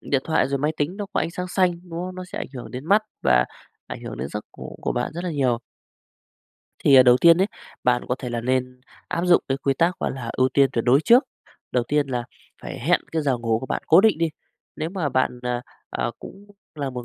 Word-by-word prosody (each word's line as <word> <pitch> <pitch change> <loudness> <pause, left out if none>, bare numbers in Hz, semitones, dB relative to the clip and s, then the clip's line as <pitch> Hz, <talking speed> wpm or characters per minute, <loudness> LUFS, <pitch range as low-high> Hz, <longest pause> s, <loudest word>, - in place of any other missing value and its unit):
điện 135 -2 0
thoại 160 - +1
rồi 140 0 -1
máy 150 +3 0
tính 155 +7 -2
nó 205 -1 -4
có - - +1
ánh 165 - -1
sáng 180 +1 -5
xanh, 185 -1 +2 0.2
đúng 165 0 -5
không? 185 +1 -5
Nó 185 0 -6
sẽ 180 - -8
ảnh - - -4
hưởng 125 - -7
đến 130 +3 -7
mắt 205 +3 +4 0.2
và - - +4 0.4
ảnh - - -8
hưởng - - -6
đến 65 +3 -4
giấc 105 +4 -5
ngủ - - -8
của - - 0
bạn 120 +4 -2
rất 175 +3 -5
là 175 - -2
nhiều. 130 -6 +1 1.2
Thì, 140 - +4
ờ, 130 - +10
đầu 125 0 +6
tiên 170 0 +7
ấy, 190 - +3 0.4
bạn 125 -1 +3
có 125 - +1
thể 125 - -5
là 120 -1 -2
nên 125 +1 -1 0.3
áp 170 - -1
dụng 175 -1 +5
cái 135 0 0
quy 135 0 0
tắc 170 +5 +1
gọi - - 0
là 120 -3 -5
ưu 130 0 +2
tiên 135 0 +3
tuyệt 115 -2 -1
đối 130 +4 +5
trước. 245 - +5 0.5
Đầu 125 -2 +1
tiên 150 -1 +2
là 125 -2 -2 0.4
phải - - -6
hẹn - - +2
cái 160 -1 0
giờ 135 -4 +1
ngủ 115 -1 0
của 130 - -7
bạn - - -2
cố 165 +4 +7
định 215 -6 +3
đi. 165 0 +2 0.5
Nếu 160 +2 -3
mà 180 -7 -1
bạn, 130 -1 0
ờ, 125 -1 -1 0.3
ờ, - - -2
cũng 200 +1 -12 0.3
là 140 -3 -3
một 125 -1 -6
140 Hz, 255 wpm, -23 LUFS, 125-170 Hz, 1.2 s, ờ